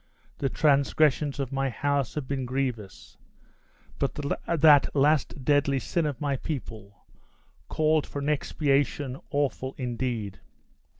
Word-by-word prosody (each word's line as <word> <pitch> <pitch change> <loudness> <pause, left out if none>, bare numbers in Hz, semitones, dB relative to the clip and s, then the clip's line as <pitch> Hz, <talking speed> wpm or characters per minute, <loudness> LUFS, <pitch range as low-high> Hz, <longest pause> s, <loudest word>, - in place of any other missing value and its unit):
The 135 - 0
transgressions 145 0 +2
of 135 -2 -3
my 135 0 0
house 140 +1 -1
have 145 -4 -4
been 135 -2 -2
grievous; 125 -6 -4 0.8
but 140 -4 -1 0.3
that 155 -4 +5
last 145 -2 +1
deadly 145 -1 +3
sin 160 +4 -1
of 140 -4 -4
my 140 -2 -1
people 110 - -7 0.6
called 155 -1 +1
for - - -8
an 140 0 -3
expiation 140 -2 0
awful 140 -2 -2
indeed! 120 -6 -3
140 Hz, 120 wpm, -27 LUFS, 130-145 Hz, 0.8 s, that